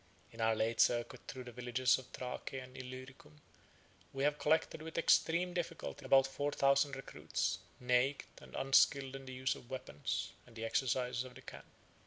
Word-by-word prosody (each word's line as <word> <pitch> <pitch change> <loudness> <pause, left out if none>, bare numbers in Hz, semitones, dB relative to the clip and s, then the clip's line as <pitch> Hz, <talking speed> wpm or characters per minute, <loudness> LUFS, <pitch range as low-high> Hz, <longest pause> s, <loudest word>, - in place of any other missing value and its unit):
In 115 - -8
our 110 0 +3
late 110 +1 +2
circuit 120 +1 +2
through 130 -1 -6
the 125 - -9
villages 125 +1 +2
of 130 - -12
Thrace 125 -1 -5
and 130 -1 -7
Illyricum, 130 - -10 0.7
we 135 0 -2
have 145 +1 +2
collected, 155 0 +2
with 160 +1 -7
extreme 170 +2 +3
difficulty, 170 -4 -4
about 135 0 +6
four 145 +2 -2
thousand 140 0 +3
recruits, 135 - -2 0.2
naked, 125 +3 +2
and - - -12
unskilled 135 0 +4
in 135 -1 -8
the 130 - -6
use 130 +1 +1
of 120 - -13
weapons 125 - -3 0.2
and 115 - -17
the 115 0 -4
exercises 125 +1 0
of 130 -1 -11
the - - -11
camp. - - -10
130 Hz, 175 wpm, -36 LUFS, 125-140 Hz, 0.7 s, about